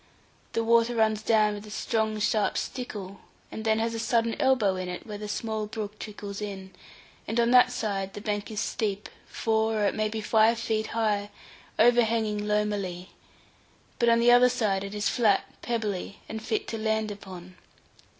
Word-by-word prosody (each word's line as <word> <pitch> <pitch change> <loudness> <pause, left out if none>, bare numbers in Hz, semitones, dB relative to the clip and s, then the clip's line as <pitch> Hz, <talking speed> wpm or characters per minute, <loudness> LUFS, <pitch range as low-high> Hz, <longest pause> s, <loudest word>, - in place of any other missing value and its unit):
The 230 - 0
water 230 +1 +3
runs 220 -1 +2
down 215 -1 +3
with 205 +1 -8
a - - -10
strong 220 0 -1
sharp 210 0 +1
stickle, 200 -6 -5 0.3
and 220 - -6
then 220 0 +2
has 230 +1 -1
a 225 - -3
sudden 230 0 +1
elbow 250 -8 +3
in 185 -1 -4
it, 180 - -6
where 210 -2 -7
the 210 - -5
small 220 0 -3
brook 210 -1 -6
trickles 205 -1 -7
in; 190 -2 -6 0.6
and 225 +3 -1
on 235 0 +3
that 250 0 +6
side 195 -5 -3
the - - -5
bank 205 -1 -3
is 215 -2 -4
steep, 210 -2 -2 0.2
four 220 0 0
or 210 -1 +1
it - - +1
may 215 0 0
be 220 +1 -4
five 220 +2 +3
feet 220 -1 -1
high, 205 -2 0 0.5
overhanging 225 -3 +3
loamily; 205 -4 -1 0.9
but 235 - +4
on 230 0 +4
the 240 +1 +5
other 245 +1 +7
side 200 -5 0
it 200 +1 -6
is 205 0 0
flat, 215 -5 +3 0.2
pebbly, 210 -5 -3
and 220 0 -5
fit 220 0 -2
to 225 - -4
land 220 -1 0
upon. 185 -3 -10
215 Hz, 180 wpm, -27 LUFS, 205-225 Hz, 0.9 s, other